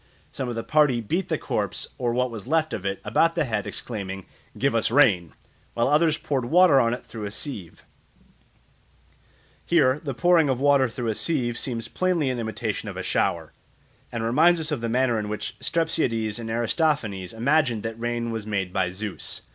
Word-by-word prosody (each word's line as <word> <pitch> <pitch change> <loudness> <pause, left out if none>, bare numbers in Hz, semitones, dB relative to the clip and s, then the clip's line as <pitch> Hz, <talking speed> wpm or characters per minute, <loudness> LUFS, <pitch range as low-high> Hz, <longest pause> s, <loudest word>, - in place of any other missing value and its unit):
Some 130 -2 -4
of 120 - -4
the 115 - -3
party 150 -5 +3
beat 165 - -2
the - - +1
corpse, - - -3
or 120 -2 0
what 125 +1 0
was 115 0 -8
left 160 +1 +1
of 100 -2 -3
it, 100 0 -2
about 165 +10 +2
the 165 -3 +1
head, 110 -5 -2
exclaiming, 95 -5 -5 0.3
"Give 140 -1 +1
us 115 -1 +2
rain!" 105 - +3 0.4
while 120 - +2
others 155 +2 +3
poured 135 -6 -2
water 165 0 +5
on 115 -1 +2
it - - -13
through 110 -2 -7
a - - -3
sieve. 105 - -6 1.8
Here 145 -5 +3
the 140 -4 -4
pouring 170 -1 +4
of 130 -2 0
water 140 -2 +4
through 115 0 -3
a - - +1
sieve 120 -3 -1
seems 115 -3 -3
plainly 170 -3 0
an 125 - -3
imitation 110 -1 -3
of - - -8
a - - -4
shower, - - -1 0.6
and 115 -1 -3
reminds 160 +9 +4
us 160 0 -1
of 145 -6 -2
the 115 - -2
manner 120 -1 +2
in 105 -1 -4
which 105 - -4
Strepsiades 120 -10 0
in 115 -1 -6
Aristophanes 115 - 0
imagined 120 -1 +1
that 115 0 -5
rain 120 0 -2
was 110 -2 -5
made 95 -3 -2
by 90 - +1
Zeus. 100 +2 -4
120 Hz, 190 wpm, -25 LUFS, 110-150 Hz, 1.8 s, water